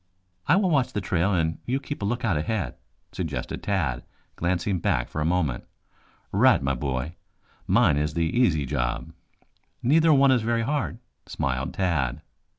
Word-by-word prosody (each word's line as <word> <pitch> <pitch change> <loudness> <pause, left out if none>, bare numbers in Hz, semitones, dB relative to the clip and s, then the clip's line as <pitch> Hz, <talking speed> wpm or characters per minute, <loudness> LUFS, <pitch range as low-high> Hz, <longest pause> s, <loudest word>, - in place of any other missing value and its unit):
"I 150 - +5
will 190 -2 +2
watch 135 -5 +2
the 105 - 0
trail 95 0 0
and 80 -3 0
you 130 +3 0
keep 145 -1 -6
a - - -1
lookout 115 -3 0
ahead," 100 +6 -2 0.4
suggested - - -4
Tad, 80 -12 -1 0.3
glancing 90 +2 0
back - - 0
for 75 - -4
a - - 0
moment. 80 -7 0 0.7
"Right, - - +5
my 70 0 0
boy. 65 +4 -3 0.5
Mine 70 - +4
is 75 0 -1
the 85 - +1
easy 80 - +2
job." 65 +3 -2 0.7
"Neither 160 +6 +4
one 140 -2 +6
is 125 -3 +3
very 115 +1 0
hard," 140 -3 -1 0.3
smiled 65 -1 -2
Tad. 75 -6 0
90 Hz, 155 wpm, -25 LUFS, 75-120 Hz, 0.7 s, one